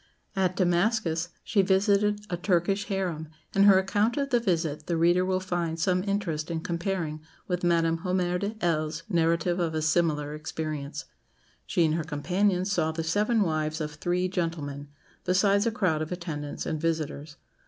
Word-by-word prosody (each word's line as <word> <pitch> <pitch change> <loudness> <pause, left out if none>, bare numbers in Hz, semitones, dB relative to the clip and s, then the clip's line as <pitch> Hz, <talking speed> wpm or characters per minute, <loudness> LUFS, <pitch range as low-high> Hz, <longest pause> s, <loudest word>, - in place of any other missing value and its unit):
" - - -40
At 180 0 -1
Damascus 175 -2 +1
she 205 - +2
visited 200 +2 +2
a 180 - -2
Turkish 180 +2 +1
harem, 180 -5 -2 0.3
and 195 +1 +5
her 200 -2 +8
account 205 +5 +1
of 275 -1 -1
the 240 - +4
visit 165 -8 -1
the 170 - 0
reader 175 +2 +4
will 185 0 +1
find 175 -3 -2
some 180 +2 +1
interest 180 -6 -2
in 165 -1 -2
comparing 170 -3 -2 0.3
with 180 -1 -2
Madame 165 -1 +2
Hommaire 180 0 0
de 205 +3 -3
Hell's 155 -1 0
narrative 170 0 +1
of 165 -2 -1
a 155 - 0
similar 155 -2 +1
experience. 155 -1 -5 0.6
She 175 -4 +2
and 155 - +1
her 165 0 0
companions 180 +6 0
saw 160 -5 +1
the 160 +1 -3
seven 210 +7 +2
wives 155 -2 -1
of 150 -1 -3
three 175 +4 0
gentlemen, 160 -6 -3 0.4
besides 200 +3 +3
a - - +2
crowd 185 -9 0
of 155 - -4
attendants 160 -5 -5
and 155 -1 -2
visitors. 155 -2 -2
175 Hz, 170 wpm, -27 LUFS, 160-190 Hz, 0.6 s, her